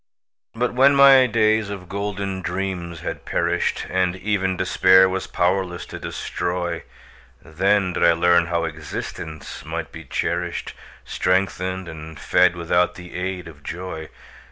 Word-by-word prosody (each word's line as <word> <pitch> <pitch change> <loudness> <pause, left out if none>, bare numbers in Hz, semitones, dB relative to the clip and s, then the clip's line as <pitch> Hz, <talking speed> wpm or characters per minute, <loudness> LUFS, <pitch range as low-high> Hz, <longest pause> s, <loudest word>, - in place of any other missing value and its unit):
But 120 +1 0
when 135 +3 +5
my 135 -2 +8
days 110 -2 +2
of 95 -3 -7
golden 100 -1 -3
dreams 90 -2 -4
had - - -5
perished, - - -1
And 90 0 0
even 95 -1 -1
Despair 95 +1 +5
was 95 0 -3
powerless 90 0 0
to - - -8
destroy, 85 -1 -3 0.6
Then 95 +3 +1
did - - -1
I 85 - +6
learn 85 0 +3
how 85 -1 0
existence 80 -1 -6
might 80 +1 -5
be 80 - -9
cherished, 85 +4 -3 0.3
Strengthened 95 0 -1
and 80 -1 -9
fed 90 -1 +3
without 85 +1 +1
the 90 -1 -11
aid 90 -1 -4
of 75 -3 -13
joy. 85 0 -6
90 Hz, 135 wpm, -22 LUFS, 85-95 Hz, 0.6 s, my